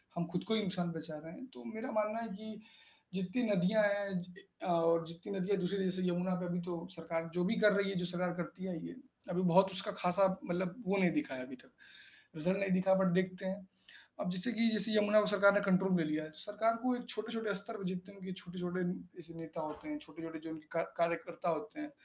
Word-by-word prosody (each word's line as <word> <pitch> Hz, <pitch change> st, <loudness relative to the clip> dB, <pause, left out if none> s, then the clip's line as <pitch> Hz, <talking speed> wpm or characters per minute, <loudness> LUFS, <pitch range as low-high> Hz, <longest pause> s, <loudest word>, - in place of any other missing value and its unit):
हम 170 Hz, 0 st, -1 dB
खुद 175 Hz, -, -2 dB
को 220 Hz, -, +1 dB
ही 220 Hz, -, +2 dB
नुकसान 180 Hz, -2 st, 0 dB
पहुँचा 160 Hz, -1 st, -6 dB
रहे 165 Hz, -, -9 dB
हैं। 265 Hz, -, -10 dB
तो -, -, -12 dB
मेरा 225 Hz, +4 st, -5 dB
मानना 215 Hz, +1 st, 0 dB
है 230 Hz, -, -4 dB
कि 215 Hz, +1 st, -9 dB, 0.5 s
जितनी 190 Hz, +6 st, -1 dB
नदियाँ 200 Hz, +2 st, +3 dB
हैं 200 Hz, -2 st, +1 dB
ज 180 Hz, +1 st, -12 dB, 0.3 s
अ, -, -, -3 dB
और 165 Hz, -1 st, +3 dB
जितनी 170 Hz, +4 st, -7 dB
नदियाँ 195 Hz, +2 st, +1 dB
दूसरी 190 Hz, +2 st, 0 dB
जैसे 185 Hz, 0 st, 0 dB
यमुना 180 Hz, +1 st, 0 dB
पे 180 Hz, -, -2 dB
अभी 175 Hz, 0 st, -2 dB
तो 170 Hz, -1 st, -4 dB
सरकार 165 Hz, -1 st, -3 dB
जो 180 Hz, 0 st, +1 dB
भी 220 Hz, -, +1 dB
कर 210 Hz, -1 st, +6 dB
रही 200 Hz, 0 st, +1 dB
है 195 Hz, -, -3 dB
जो 180 Hz, -, -1 dB
सरकार 180 Hz, 0 st, 0 dB
करती 185 Hz, +2 st, -6 dB
आयी 170 Hz, -3 st, -5 dB
है, -, -, -9 dB, 0.4 s
अभी 180 Hz, -, 0 dB
बहुत 190 Hz, +2 st, +5 dB
उसका 195 Hz, +2 st, +5 dB
ख़ासा 190 Hz, 0 st, +3 dB, 0.2 s
मतलब 180 Hz, +1 st, -1 dB
वो 200 Hz, -, +2 dB
नहीं 180 Hz, -3 st, +4 dB
दिखा 150 Hz, -3 st, -1 dB
है 130 Hz, -, -5 dB
अभी 130 Hz, -, -9 dB
तक, -, -, -18 dB, 0.6 s
रिजल्ट 180 Hz, +5 st, +1 dB
नहीं 195 Hz, -1 st, 0 dB
दिखा। 185 Hz, +1 st, +4 dB
बट 190 Hz, -, +3 dB
देखते 185 Hz, +1 st, 0 dB
हैं। 190 Hz, +1 st, -4 dB, 0.6 s
अब 185 Hz, -, -1 dB
जैसे 185 Hz, +6 st, +5 dB
कि 230 Hz, +1 st, +3 dB
जैसे 215 Hz, 0 st, +5 dB
यमुना 210 Hz, 0 st, +5 dB
को 210 Hz, -, +1 dB
सरकार 200 Hz, -1 st, +6 dB
ने 205 Hz, -, +4 dB
कंट्रोल 190 Hz, 0 st, +3 dB
में 165 Hz, -, +1 dB
लिया 155 Hz, 0 st, -1 dB
है। 155 Hz, -, -9 dB
सरकार 210 Hz, +7 st, +1 dB
को 255 Hz, 0 st, +2 dB
एक 245 Hz, -1 st, -8 dB
छोटे-छोटे 225 Hz, -2 st, -1 dB
स्तर 210 Hz, +3 st, +1 dB
पे 195 Hz, -, -7 dB
जितने 185 Hz, +2 st, -7 dB
उनके 190 Hz, -1 st, -7 dB
छोटे-छोटे 180 Hz, 0 st, -4 dB, 0.4 s
ऐसे 165 Hz, 0 st, -10 dB
नेता 165 Hz, 0 st, -7 dB
होते 155 Hz, -, -7 dB
हैं, 300 Hz, -1 st, -4 dB
छोटे-छोटे 165 Hz, -, -8 dB
जो -, -, -6 dB
उनके 155 Hz, -1 st, -9 dB
का 165 Hz, -, +1 dB, 0.2 s
कार्यकर्ता 170 Hz, +1 st, -1 dB
होते 220 Hz, -, -4 dB
हैं, 305 Hz, 0 st, -6 dB
185 Hz, 235 wpm, -34 LUFS, 175-205 Hz, 0.6 s, कर